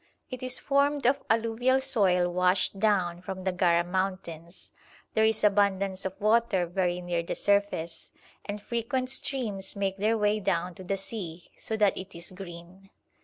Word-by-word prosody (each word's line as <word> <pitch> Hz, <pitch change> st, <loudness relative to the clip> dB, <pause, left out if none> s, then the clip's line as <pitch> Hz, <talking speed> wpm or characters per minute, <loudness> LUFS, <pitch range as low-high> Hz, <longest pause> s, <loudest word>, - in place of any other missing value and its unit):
It 255 Hz, -, -6 dB
is 255 Hz, -1 st, -1 dB
formed 280 Hz, 0 st, +1 dB
of 275 Hz, +3 st, +3 dB
alluvial 230 Hz, +3 st, +2 dB
soil 195 Hz, -10 st, +3 dB
washed 180 Hz, +2 st, +2 dB
down 185 Hz, -5 st, +1 dB
from 190 Hz, +1 st, -6 dB
the 190 Hz, -, +1 dB
Gara 175 Hz, -1 st, +3 dB
mountains; 175 Hz, -2 st, -4 dB, 0.4 s
there 220 Hz, -, +3 dB
is 220 Hz, -1 st, +2 dB
abundance 200 Hz, -2 st, +2 dB
of 190 Hz, 0 st, -4 dB
water 215 Hz, -3 st, +3 dB
very 180 Hz, 0 st, -1 dB
near 175 Hz, -1 st, -1 dB
the 170 Hz, -, -4 dB
surface, 200 Hz, -5 st, 0 dB, 0.3 s
and 205 Hz, 0 st, -5 dB
frequent 235 Hz, +4 st, -2 dB
streams 220 Hz, -9 st, -2 dB
make 195 Hz, -1 st, -1 dB
their 215 Hz, +3 st, +2 dB
way 210 Hz, 0 st, +2 dB
down 180 Hz, -3 st, -1 dB
to 185 Hz, -, -11 dB
the 195 Hz, +2 st, -1 dB
sea, 185 Hz, -4 st, -7 dB
so 220 Hz, -, -4 dB
that 205 Hz, -2 st, +3 dB
it 190 Hz, -1 st, -8 dB
is 170 Hz, +2 st, -9 dB
green. 185 Hz, +1 st, -11 dB
195 Hz, 165 wpm, -28 LUFS, 180-220 Hz, 0.4 s, of